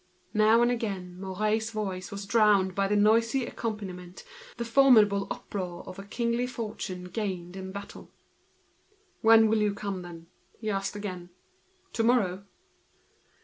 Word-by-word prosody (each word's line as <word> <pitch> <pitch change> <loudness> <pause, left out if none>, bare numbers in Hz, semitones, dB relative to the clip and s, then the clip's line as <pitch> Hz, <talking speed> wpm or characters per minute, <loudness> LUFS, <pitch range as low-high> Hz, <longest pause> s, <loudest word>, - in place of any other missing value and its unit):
Now 220 +2 +5
and 240 - +3
again, 195 -7 -4
Mouret's 215 +4 -1
voice 195 -4 -4
was 200 0 -6
drowned 205 -3 +3
by 195 +1 +1
the 210 - +1
noise 225 +4 +3
which 265 -2 0
accompanied 210 -4 -4
him, 180 0 -9
with 180 - -13 0.3
the 235 - -3
formidable 225 -6 +5
uproar 180 -3 -5
of 185 - -8
a - - -7
kingly 235 +4 -1
fortune 210 -6 -5
gained 180 -2 -4
in 190 0 -6
battle. 200 +1 -9 1.1
"When 225 0 +7
will 220 0 +2
you 210 -1 +1
come, 200 -2 -4
then?" 170 -2 -10 0.4
asked 195 -1 -2
he - - -4
again. 180 -4 -6 0.6
"Tomorrow?" 215 -5 +1
205 Hz, 145 wpm, -28 LUFS, 190-225 Hz, 1.1 s, When